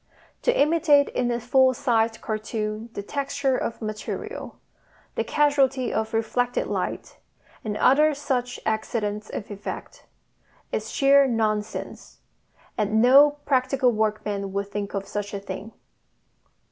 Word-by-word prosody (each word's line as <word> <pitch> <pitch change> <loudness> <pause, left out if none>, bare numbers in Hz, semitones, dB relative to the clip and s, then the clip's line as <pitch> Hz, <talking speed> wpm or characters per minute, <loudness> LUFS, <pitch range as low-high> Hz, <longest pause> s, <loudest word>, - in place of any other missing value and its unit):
To - - +1
imitate 300 -2 +4
in 245 -1 -1
a 240 0 0
full 260 +2 +3
sized 230 -4 +1
cartoon 215 0 -4
the 200 - -5
texture 275 +1 -1
of 230 -2 -3
material, 215 0 -5 0.6
the - - -1
casualty 275 -3 +2
of 220 0 -1
reflected 245 +2 0
light, - - -4 0.4
and 210 -1 -3
other 300 +5 +4
such 250 -4 -2
accidents 215 -1 -2
of 205 - -6
effect, 205 0 -8 0.6
is 215 +1 -3
sheer 275 0 +5
nonsense, 220 -3 -2 0.6
and 215 +1 +2
no 280 +5 +6
practical 260 -1 +2
workman 210 -2 -1
would 200 0 -2
think 205 0 -4
of 195 0 -3
such 205 0 -4
a - - -3
thing. 195 +2 -7
230 Hz, 125 wpm, -25 LUFS, 215-270 Hz, 0.6 s, no